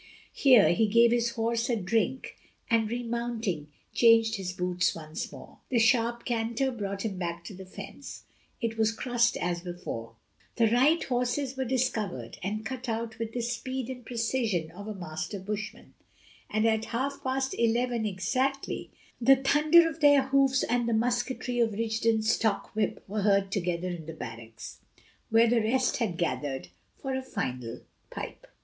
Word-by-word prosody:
Here 255 -7 +6
he 220 +4 +2
gave 230 +2 +5
his 240 0 +2
horse 230 +1 0
a 240 - +2
drink, 225 +6 -1 0.4
and, 225 -2 +3
remounting, 235 -8 -2 0.3
changed 225 -2 +5
his 185 -2 -4
boots 180 0 0
once 155 -1 -6
more. - - -12
A 250 - +1
sharp 235 0 +3
canter 235 +2 0
brought 200 -3 -4
him 195 -4 -3
back 170 -1 -3
to 205 - -8
the 190 0 -10
fence; - - -9 0.4
it 225 -2 -3
was 220 0 +3
crossed 235 0 +1
as 175 -1 -2
before; 175 -11 -6 0.4
the 230 - +4
right 295 +7 +4
horses 250 +2 -1
were 265 0 -2
discovered 225 - -2
and 215 +3 -3
cut 255 +1 -5
out 225 0 -3
with 225 0 -4
the 245 - -2
speed 255 +2 -3
and 250 -1 -8
precision 225 -8 -1
of 200 +4 -9
a 215 - -5
master 175 +2 -5
bushman; 210 +2 -6 0.6
and 215 +1 +1
at 220 -1 +2
half 270 +4 -3
past 265 0 -1
eleven 235 0 +1
exactly 255 +8 -1 0.3
the 270 +3 +7
thunder 300 +5 +5
of 325 0 -5
their 285 -2 +6
hoofs 270 -1 +3
and 240 -1 +1
the - - +1
musketry 245 +2 0
of 225 -2 +2
Rigden's 220 0 +1
stock 220 0 0
whip 215 -2 -1
were 210 +2 -2
heard 200 -1 +2
together 180 -2 -1
in 170 -3 -6
the 160 - -5
barracks, 115 -4 -9 0.5
where 225 +1 +5
the 235 0 +3
rest 250 +4 +1
had 215 -9 -1
gathered 145 -5 -2 0.3
for 270 -1 -4
a 260 - -1
final 125 - -4 0.3
pipe. - - -7
225 Hz, 165 wpm, -28 LUFS, 195-245 Hz, 0.6 s, the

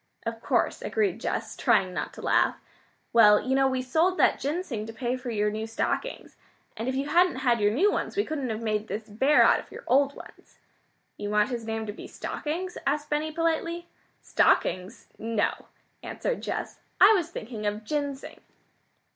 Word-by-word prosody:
"Of 230 0 -4
course," - - 0
agreed 420 -3 -1
Jess, - - -3
trying 210 -7 +2
not - - -3
to - - -10
laugh. - - +2 0.5
"Well, 210 -3 +7
you 265 +1 -1
know 270 0 +4
we 260 -1 -1
sold 325 +8 +2
that - - +3
ginseng 280 - -3
to 225 - -7
pay 240 +2 -2
for 255 -1 -6
your 210 -2 0
new 220 +1 -4
stockings. 225 - -3 0.4
And 225 +3 -4
if 260 - -2
you 275 +2 -1
hadn't 350 0 +4
had 240 -2 +3
your 205 - +4
new 370 - +3
ones, - - -3
we 410 - +2
couldn't 285 -5 -3
have 220 +1 -4
made 215 -1 -1
this 215 +3 -5
bear 265 +8 +4
out - - +5
of - - -12
your - - -9
old 280 +2 +3
ones." - - -14 0.6
"You 205 - -4
want 210 +2 +2
his 235 -3 -4
name 220 0 -2
to 205 - -5
be - - -10
Stockings?" 350 +4 -4
asked 295 +2 -1
Benny 305 +1 0
politely. 335 +1 -1 0.3
"Stockings? 185 +1 +1
No," 225 -1 -1 0.3
answered - - -3
Jess. - - -4 0.2
"I 405 +3 +8
was 350 -5 0
thinking 220 -8 -5
of 210 +1 -3
'Ginseng.'" 285 +2 -4
255 Hz, 185 wpm, -27 LUFS, 220-310 Hz, 0.6 s, I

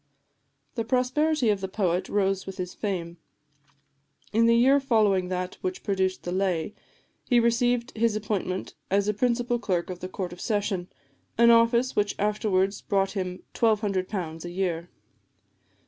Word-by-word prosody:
The 230 - -2
prosperity 255 +2 +1
of 200 -2 -1
the 190 - -2
poet 185 -2 -1
rose 195 -2 0
with 195 0 -7
his 180 -1 -4
fame. 175 -5 -4 1.2
In 230 +2 +4
the 230 - +5
year 265 +4 +5
following 215 -8 +2
that 180 0 -4
which 370 0 -4
produced 190 -2 -1
the 175 - -4
"Lay," 185 -1 -1 0.5
he 245 -2 +4
received 235 +2 +1
his 225 -1 +1
appointment 200 -3 -3 0.2
as 200 +1 +2
a 210 - +2
principal 240 +2 0
clerk 185 -6 -1
of 180 - -7
the 185 - -6
Court 185 -2 -5
of 175 - -11
Session, 200 -4 -1 0.5
an 235 +1 +7
office 235 +2 +4
which 205 -1 +1
afterwards 200 -2 0
brought 195 -2 0
him 185 -2 -4
£1200 195 -6 0
a 175 - -5
year. 175 -2 -2
200 Hz, 150 wpm, -26 LUFS, 185-230 Hz, 1.2 s, an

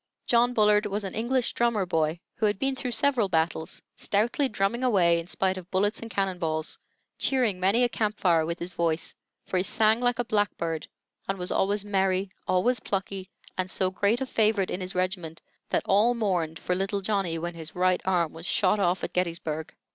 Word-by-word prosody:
John 245 +1 +3
Bullard 210 -1 +4
was 205 +1 -2
an 195 - -5
English 245 +2 0
drummer 235 -5 +1
boy, 160 -1 0 0.2
who 215 - +2
had 205 - 0
been 270 +4 0
through 260 -1 -4
several 250 -7 +2
battles, 160 -1 -1
stoutly 235 +7 +1
drumming 210 +4 0
away 180 -9 +4
in 170 - -7
spite 190 0 0
of 180 -1 -9
bullets 205 +3 +1
and 230 - -7
cannon 195 -3 -1
balls; 160 -2 0 0.4
cheering 245 -8 +1
many 200 +7 +3
a - - +5
camp 215 -2 -1
fire 170 -4 +3
with 170 +2 -3
his 175 +1 -6
voice, 170 -2 -1 0.3
for 185 - -1
he 180 - +2
sang 220 +3 +3
like 245 -1 +1
a 245 - -1
blackbird, 170 -7 -1 0.4
and 195 - -1
was 180 -1 -3
always 200 +1 +1
merry, 190 -1 +1 0.2
always 240 +8 +2
plucky, 195 -1 -4 0.3
and 185 0 -1
so 185 0 0
great 205 +5 +1
a - - 0
favorite 215 -5 +1
in 185 - -3
his 185 +1 -4
regiment, 180 -3 -2 0.3
that - - 0
all 215 +5 +4
mourned 180 -8 -1
for 180 - -2
"little 195 +2 -1
Johnny" 195 -4 0
when 175 +2 -4
his 160 -2 -8
right 180 0 +2
arm 175 -4 +1
was 165 +2 -8
shot 205 +1 +2
off 180 -1 +1
at - - -3
Gettysburg. 165 -3 -2
195 Hz, 200 wpm, -27 LUFS, 175-215 Hz, 0.4 s, a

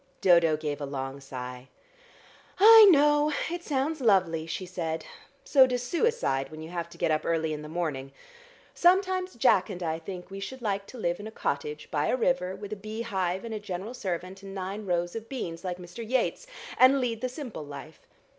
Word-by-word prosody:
Dodo 170 -4 +5
gave 150 -2 -4
a - - -2
long 135 0 -5
sigh. 125 -1 -8 0.9
"I 440 +1 +10
know; 295 -2 +4 0.2
it 345 0 -4
sounds 295 +1 -1
lovely," 180 -8 +2
she 185 +3 -4
said. 165 -3 -4 0.4
"So 265 -3 +6
does 250 -1 -2
suicide 335 - 0
when 155 0 -9
you 160 - -8
have 170 -1 -4
to - - -14
get - - +1
up 155 0 +1
early 160 -1 0
in 150 - -5
the 150 - -9
morning. 150 -5 -3 0.6
Sometimes 370 +1 +2
Jack 210 -4 +3
and 180 -3 -5
I 160 -1 -2
think 180 +2 -8
we 195 - -6
should 240 +6 -7
like 200 -2 -2
to 255 - -11
live 175 -5 -1
in 205 - -7
a - - -8
cottage 150 -5 -3
by 150 -1 0
a - - +1
river 225 -7 0
with 205 +1 -7
a - - -6
bee 215 +3 -5
hive 190 -3 -2
and 230 - -5
a 215 - -3
general 205 +2 -6
servant, 185 -3 -5
and 195 0 -9
nine 195 +2 -5
rows 175 +1 -1
of 225 0 -6
beans 170 -11 -5
like 180 -1 -3
Mr. 180 +6 -9
Yeats, 260 - -1 0.3
and 265 +2 +7
lead 235 -3 -2
the 255 - -1
simple 250 - -7
life. 145 +2 -10
190 Hz, 200 wpm, -28 LUFS, 160-250 Hz, 0.9 s, I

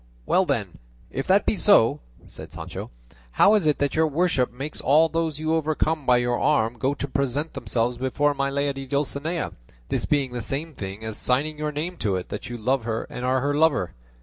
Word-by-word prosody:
"Well 190 - +3
then, 110 - -2 0.3
if 135 - -3
that 195 +2 +4
be - - +2
so," 115 - +5 0.3
said - - -10
Sancho, - - -7 0.4
"how 205 - +6
is 205 -7 +3
it 150 - +3
that 145 -1 0
your 160 0 +3
worship 150 -4 +1
makes 135 +5 -6
all 155 +5 +5
those 165 -2 -1
you 155 +1 0
overcome 155 -1 0
by 125 -1 +6
your 120 0 0
arm 120 -5 +1
go 135 +3 0
to 140 - -4
present 140 +3 -1
themselves 120 +1 -1
before 145 +3 +1
my 140 0 -1
lady 140 -1 -2
Dulcinea, 145 +4 -2 0.4
this - - 0
being 140 -4 +1
the 120 -1 -4
same 150 +6 -3
thing 100 -2 -7
as 110 -1 -4
signing 150 +4 0
your 150 0 -1
name 165 +5 -4
to 100 -9 0
it 90 - -4
that 105 +4 -6
you 120 - -5
love 125 +3 0
her 115 0 -2
and 125 - -6
are 130 +1 +1
her 145 +2 0
lover? 145 - +2
140 Hz, 205 wpm, -24 LUFS, 125-155 Hz, 0.4 s, how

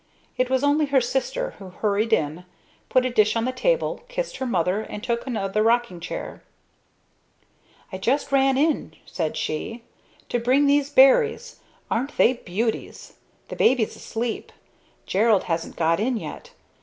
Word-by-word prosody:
It 255 0 0
was 260 +1 +1
only 290 +1 +3
her 275 -1 +4
sister, 270 - -2
who 195 -2 -9
hurried 210 +4 -1
in, 160 -2 0 0.4
put 255 0 +3
a 255 - 0
dish 215 -2 +3
on 230 0 0
the 255 - 0
table, - - 0
kissed - - -4
her 265 - -3
mother 185 -1 0
and 210 -1 -8
took 235 0 -2
another 215 -4 -1
rocking 230 -4 +1
chair. 175 - -6 1.5
"I 190 - -4
just 270 +8 0
ran 270 -1 +3
in," 305 +1 0
said 160 -4 -3
she, 230 +10 -4 0.5
"to 240 - 0
bring 255 +5 +3
those 285 0 +3
berries. 440 - +4 0.3
Aren't 260 +6 -2
they 255 - +5
beauties? 225 0 -4 0.4
The - - -5
baby's 245 -4 +2
asleep. 230 0 -4 0.5
Gerald 210 +1 +3
hasn't 165 -1 -3
got 165 +1 +1
in 240 +3 0
yet. - - -8
240 Hz, 155 wpm, -24 LUFS, 205-270 Hz, 1.5 s, they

